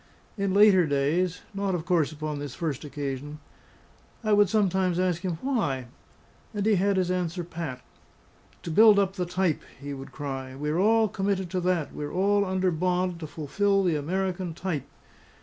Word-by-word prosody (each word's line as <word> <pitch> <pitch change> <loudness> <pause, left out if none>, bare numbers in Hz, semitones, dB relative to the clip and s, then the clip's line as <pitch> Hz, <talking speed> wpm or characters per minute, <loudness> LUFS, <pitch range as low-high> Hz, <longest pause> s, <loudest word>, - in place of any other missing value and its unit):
In 200 -2 -1
later 200 -5 +6
days 155 +6 0
(not 195 -1 -1
of 165 -2 -4
course 170 -5 +2
upon 155 -1 -4
this 145 -2 -6
first 155 -5 -3
occasion) 145 0 -5 0.9
I 215 -1 +2
would 205 -2 +5
sometimes 190 -4 +1
ask 180 -2 +1
him 180 -4 -2
why; 145 - -1 0.7
and 205 -1 -1
he 220 - +4
had 200 +1 +2
his 180 -1 +1
answer 180 -1 -2
pat. 165 -7 -6 0.8
"To 170 - -4
build 215 +4 +7
up 195 -1 +2
the 180 -3 -3
type!" 180 -3 0 0.2
he 140 +1 -6
would 135 0 -8
cry. 135 -3 -5
"We're 150 +4 -1
all 220 +2 +4
committed 195 -2 -2
to 185 -1 -1
that; 175 -4 0
we're 145 0 -5
all 200 +2 +2
under 185 -1 0
bond 180 +1 0
to 155 - -6
fulfil 195 +7 0
the 175 -4 +2
American 180 +2 -2
Type! 170 -6 -3
180 Hz, 170 wpm, -27 LUFS, 150-195 Hz, 0.9 s, build